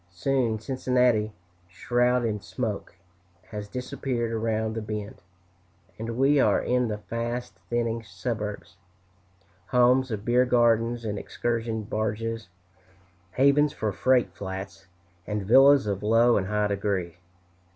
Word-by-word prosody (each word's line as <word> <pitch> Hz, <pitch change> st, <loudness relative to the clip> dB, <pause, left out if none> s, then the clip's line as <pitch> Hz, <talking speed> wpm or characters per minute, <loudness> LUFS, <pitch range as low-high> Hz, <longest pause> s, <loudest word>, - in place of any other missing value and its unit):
Soon 115 Hz, +5 st, 0 dB
Cincinnati, 125 Hz, -2 st, +1 dB, 0.4 s
shrouded 120 Hz, +5 st, +1 dB
in 105 Hz, -2 st, -3 dB
smoke, 110 Hz, -3 st, -4 dB, 0.6 s
has 105 Hz, -1 st, -5 dB
disappeared 125 Hz, -1 st, -3 dB
around 110 Hz, -1 st, -1 dB
the 115 Hz, -, -3 dB
bend, 105 Hz, -1 st, -6 dB, 0.8 s
and 115 Hz, +1 st, -4 dB
we 140 Hz, +2 st, +4 dB
are -, -, +4 dB
in 125 Hz, 0 st, +1 dB
the 105 Hz, -1 st, -3 dB
fast 120 Hz, +3 st, -5 dB
thinning 115 Hz, -1 st, -1 dB
suburbs 105 Hz, -6 st, -5 dB, 0.9 s
homes 125 Hz, +1 st, +3 dB
of 105 Hz, -2 st, -4 dB
beer 125 Hz, +1 st, +4 dB
gardens 120 Hz, -1 st, +2 dB
and 105 Hz, -2 st, -2 dB
excursion 115 Hz, -2 st, -2 dB
barges, 110 Hz, 0 st, -3 dB, 0.8 s
havens 140 Hz, +2 st, +4 dB
for 110 Hz, -1 st, -2 dB
freight 130 Hz, +5 st, +2 dB
flats, 95 Hz, 0 st, -7 dB, 0.4 s
and 105 Hz, -2 st, -3 dB
villas 135 Hz, +5 st, +6 dB
of 100 Hz, -2 st, -2 dB
low 115 Hz, +3 st, +4 dB
and 95 Hz, -2 st, 0 dB
high 105 Hz, +1 st, 0 dB
degree. 100 Hz, -4 st, -2 dB
115 Hz, 120 wpm, -26 LUFS, 105-125 Hz, 0.9 s, villas